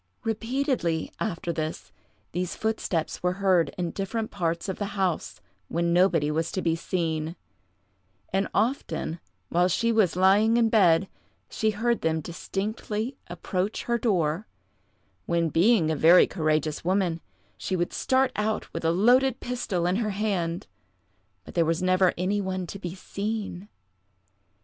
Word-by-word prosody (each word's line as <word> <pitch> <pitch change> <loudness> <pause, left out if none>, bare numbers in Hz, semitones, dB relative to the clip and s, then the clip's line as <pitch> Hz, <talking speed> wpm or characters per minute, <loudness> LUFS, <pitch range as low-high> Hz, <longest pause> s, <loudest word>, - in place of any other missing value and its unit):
Repeatedly, 225 - -1
after 170 -4 -2
this, 155 - -4 0.4
these 180 0 -2
footsteps 215 -7 -2
were 180 0 +1
heard 185 -5 +2
in 175 -2 -2
different 215 +3 -3
parts 170 -2 -2
of 190 - -4
the 205 -1 -4
house, 165 - -1 0.3
when 170 - 0
nobody 170 -4 +3
was 160 +2 -1
to - - -1
be 165 -1 +2
seen; 165 -2 -2 1.0
and 195 0 +1
often, 215 - -1 0.3
while 175 +1 +3
she 230 +6 +1
was 215 -7 +3
lying 200 +5 +4
in 230 -1 +3
bed, 190 -5 +4 0.4
she 220 - +1
heard 230 +3 0
them 160 0 +1
distinctly 210 - -4
approach 180 +3 -3
her 235 0 0
door, 180 -4 0 0.8
when, 170 -1 +1
being 170 0 +3
a - - 0
very 165 +4 +7
courageous 155 -3 -1
woman, 180 -2 0 0.3
she 190 - -3
would 175 -1 -1
start 260 0 +2
out 215 +1 -2
with 165 - -4
a 165 - +3
loaded 245 +8 +4
pistol 230 -8 -2
in 180 +2 +1
her 220 -2 0
hand, 190 -5 -1 0.8
but - - -11
there 170 - +3
was 165 +2 0
never 185 0 +4
any 195 +4 0
one 185 -1 -3
to 200 - -8
be 175 -2 -5
seen. 205 0 -4
185 Hz, 145 wpm, -26 LUFS, 170-215 Hz, 1.0 s, very